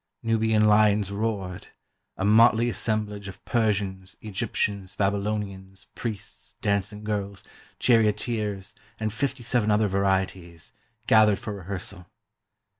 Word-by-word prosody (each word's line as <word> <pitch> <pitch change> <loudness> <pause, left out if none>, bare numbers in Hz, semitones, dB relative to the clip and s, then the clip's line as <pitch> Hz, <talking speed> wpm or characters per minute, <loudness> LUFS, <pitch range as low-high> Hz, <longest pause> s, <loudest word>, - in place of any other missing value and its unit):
Nubian 110 -1 +2
lions 105 -1 +4
roared; 100 -3 -3 0.5
a 95 - -1
motley 115 +2 +5
assemblage 105 -3 -2
of 95 0 -11
Persians, 100 -5 -1
Egyptians, 100 -2 -2
Babylonians, 100 -1 -2
priests, 110 -4 -6
dancing 100 +1 -1
girls, 100 -2 -3 0.3
charioteers, 105 -3 +1 0.3
and 110 -1 -2
fifty 130 +1 -2
seven 115 -2 +1
other 105 0 +3
varieties, 95 -3 -1 0.3
gathered 105 -3 +5
for 110 -4 -6
rehearsal. 95 -1 -6
105 Hz, 105 wpm, -26 LUFS, 95-110 Hz, 0.5 s, motley